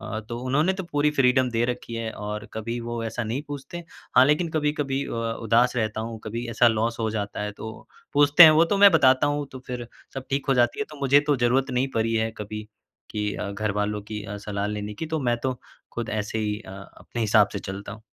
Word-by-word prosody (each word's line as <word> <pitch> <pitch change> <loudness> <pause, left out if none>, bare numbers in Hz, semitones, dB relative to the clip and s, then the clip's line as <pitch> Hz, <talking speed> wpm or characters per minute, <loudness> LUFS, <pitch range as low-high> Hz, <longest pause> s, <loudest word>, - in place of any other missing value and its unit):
अ, 110 - -5
तो 120 - -4
उन्होंने 150 +8 +2
तो 190 0 -5
पूरी 145 +1 +2
फ़्रीडम 130 -2 +3
दे 115 0 +1
रखी 120 -1 -4
है 115 -1 -3
और 105 +1 -5
कभी 115 +2 -4
वो 120 0 -4
ऐसा 115 +2 -3
नहीं 120 +6 -3
पूछते। 145 +4 -7 0.4
हाँ, 130 - +9
लेकिन 150 +4 +2
कभी-कभी 145 -3 -1
अ, - - -7 0.3
उदास 120 +3 +3
रहता 110 -2 -1
हूँ 115 0 -5
कभी 115 +3 -4
ऐसा 120 +1 +4
लॉस 115 +1 -1
हो 110 - 0
जाता 105 -2 -4
है 105 0 -3
तो 110 +1 -7 0.4
पूछते 145 +3 +7
हैं 160 - +11
वो, 155 +2 +5
तो 185 +4 0
मैं 200 0 +9
बताता 130 -3 +5
हूँ 145 0 -1
तो 130 - -7
फ़िर 125 -1 -5 0.3
सब 135 -1 -6
ठीक 135 +1 -1
हो 135 - +4
जाती 120 -1 +2
है। 215 - +1
तो 150 - -10
मुझे 140 +1 +5
तो 145 -2 +3
ज़रूरत 125 +2 +1
नहीं 125 +2 0
पड़ी 115 0 +1
है 110 0 +1
कभी 105 +1 -6 0.4
कि 105 -1 -2
अ, 100 - -4
घरवालों 105 0 -2
की 105 0 -6
अ, 105 +1 -6
सलाह 100 0 -3
लेने 105 0 -4
की 160 - -5
तो 160 - +1
मैं 120 -2 +1
तो 130 -2 -2 0.3
खुद 120 -1 -4
ऐसे 110 +1 -2
ही 105 -1 -1
अ, 95 - -12 0.3
अपने 120 - -7
हिसाब 105 -1 +4
से - - -3
चलता 95 +1 -7
हूँ। 110 -1 -12
120 Hz, 235 wpm, -25 LUFS, 110-135 Hz, 0.4 s, हैं